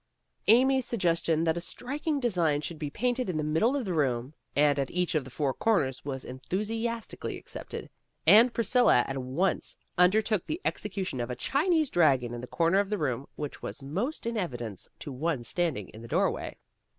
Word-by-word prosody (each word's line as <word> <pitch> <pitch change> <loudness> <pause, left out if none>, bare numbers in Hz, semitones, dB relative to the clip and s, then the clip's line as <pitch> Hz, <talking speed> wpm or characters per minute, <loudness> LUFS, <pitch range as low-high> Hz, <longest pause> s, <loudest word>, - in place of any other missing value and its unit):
Amy's 260 +2 +5
suggestion 170 -7 +1
that 165 0 +1
a - - -2
striking 285 - -2
design 175 - +1
should 155 +2 -5
be 150 -2 -3
painted 245 - -1
in 170 - -1
the 155 - 0
middle 160 - +2
of 270 -4 -1
the 185 - -2
room, 130 -3 0 0.2
and 145 -1 +4
at 135 - -1
each 180 0 -1
of 155 -3 +1
the 130 - -10
four 135 +1 -1
corners, 140 - +1
was 135 -2 -5
enthusias 215 - -3
tically - - -6
accepted, - - -8 0.4
and 230 +4 +8
Priscilla 235 - +4
at 135 0 -3
once 130 +10 -1 0.2
under 180 +4 +6
took 215 -4 0
the 315 - -2
execution 190 -9 -2
of 120 0 -2
a 125 - -3
Chinese 310 - +1
dragon 135 -8 +3
in 120 - -5
the 125 - -7
corner 170 +6 +2
of 200 -1 0
the 210 - 0
room 135 -5 -2
which 145 -2 -6
was - - -6
most 200 - -3
in 230 0 -1
evidence 120 - -4
to 145 - -7
one 135 -1 -1
standing 135 - -1
in 110 - -12
the 115 - -9
doorway. - - 0
170 Hz, 195 wpm, -29 LUFS, 135-225 Hz, 0.4 s, and